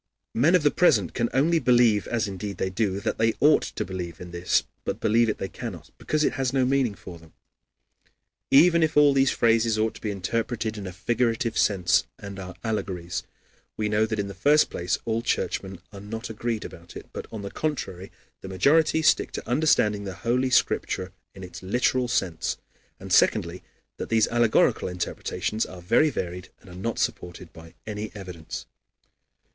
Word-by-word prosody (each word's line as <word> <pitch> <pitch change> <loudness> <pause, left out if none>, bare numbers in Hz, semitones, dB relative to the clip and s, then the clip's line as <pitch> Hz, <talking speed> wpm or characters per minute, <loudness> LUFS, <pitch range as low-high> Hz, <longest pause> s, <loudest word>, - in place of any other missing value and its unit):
Men 155 +10 +4
of 175 - +3
the 145 - +4
present 110 - +3
can 115 -1 0
only 160 +5 +3
believe, 120 -6 +3
as 115 -2 -1
indeed 100 +1 -5
they 95 - -2
do, 100 0 -1
that - - -2
they 115 0 +2
ought 150 +2 +5
to - - -4
believe 90 -2 -6
in 90 -1 -9
this; 85 +1 +1 0.2
but - - -3
believe 115 +1 +3
it 105 - -1
they 95 - -4
cannot, 105 -6 -8
because 155 0 0
it - - +1
has 130 -2 -1
no 135 -2 +2
meaning 130 -5 +1
for 90 -3 -11
them. 80 -1 -19 1.2
Even 170 +4 +6
if 155 -2 +1
all 145 -1 +6
these 135 0 +3
phrases 115 -1 +2
ought 110 +1 +1
to - - -13
be 110 - -3
interpreted 110 +3 -2
in 100 -3 -6
a - - -5
figurative 115 +3 -1
sense 90 -4 +2
and 100 -1 -8
are 90 -1 -8
allegories, 95 -6 -3 0.6
we 110 - 0
know 105 +1 +2
that 110 -1 -3
in 100 -1 -2
the 100 - -7
first 145 - +3
place 90 0 -1
all 115 0 0
Churchmen 95 -5 -2
are 100 - -9
not 110 +3 -6
agreed 115 0 -3
about 85 0 -11
it, - - -10
but, - - -6
on 110 -3 -6
the 100 - -6
contrary, 100 - -4 0.3
the - - -8
majority 155 - +3
stick 155 - +3
to - - -6
understanding 120 -6 +2
the 95 -2 -6
Holy 125 +2 +2
Scripture 95 -6 +1 0.2
in 95 - -10
its 90 - -9
literal 125 +5 +1
sense; 90 -8 -1 0.4
and - - -4
secondly, - - +3 0.4
that - - -5
these 110 -1 +3
allegorical 120 -1 +2
interpretations 90 +3 -3
are 95 - -8
very 100 - +3
varied 90 -7 -5
and 95 - -15
are - - -11
not 110 +5 -3
supported 90 0 -4
by 80 0 -14
any 105 0 -5
evidence. 90 -5 -7
110 Hz, 185 wpm, -25 LUFS, 95-125 Hz, 1.2 s, Even